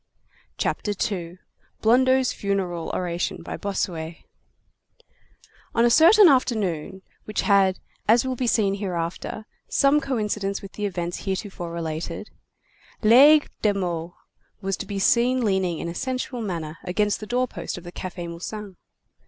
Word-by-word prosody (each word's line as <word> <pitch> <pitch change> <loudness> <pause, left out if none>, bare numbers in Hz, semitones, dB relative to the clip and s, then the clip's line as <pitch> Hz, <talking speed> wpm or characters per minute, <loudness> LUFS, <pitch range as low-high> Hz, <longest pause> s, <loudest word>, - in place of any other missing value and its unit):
CHAPTER 205 - -1
II—BLONDEAU'S 225 +8 0
FUNERAL 190 -4 -2
ORATION 175 -1 -2
BY - - -5
BOSSUET 175 -5 -3 1.6
On 230 0 +4
a 240 - +4
certain 360 - +8
afternoon, 200 - +1 0.2
which 215 - -2
had, 195 -2 +3 0.3
as 230 +4 +5
will 260 0 -1
be 250 0 -2
seen 205 -4 +2
hereafter, 185 +1 -4 0.2
some 280 +2 +4
coincidence 210 -6 -2
with 195 - -9
the 210 -1 -2
events 175 -2 -4
heretofore 190 -3 -4
related, 165 +3 -5 0.7
Laigle 285 +7 +7
de 205 -2 +2
Meaux 175 -3 -3 0.4
was 195 0 -2
to - - -6
be 200 - -4
seen 240 +5 +3
leaning 190 -4 +1
in - - -4
a 170 - -4
sensual 255 +3 -3
manner 165 -6 -4
against 205 +3 0
the 215 - -8
doorpost 250 -3 -2
of 175 - -9
the 175 - -9
Café 175 -1 -6
Musain. 190 +3 -7
200 Hz, 135 wpm, -24 LUFS, 175-235 Hz, 1.6 s, certain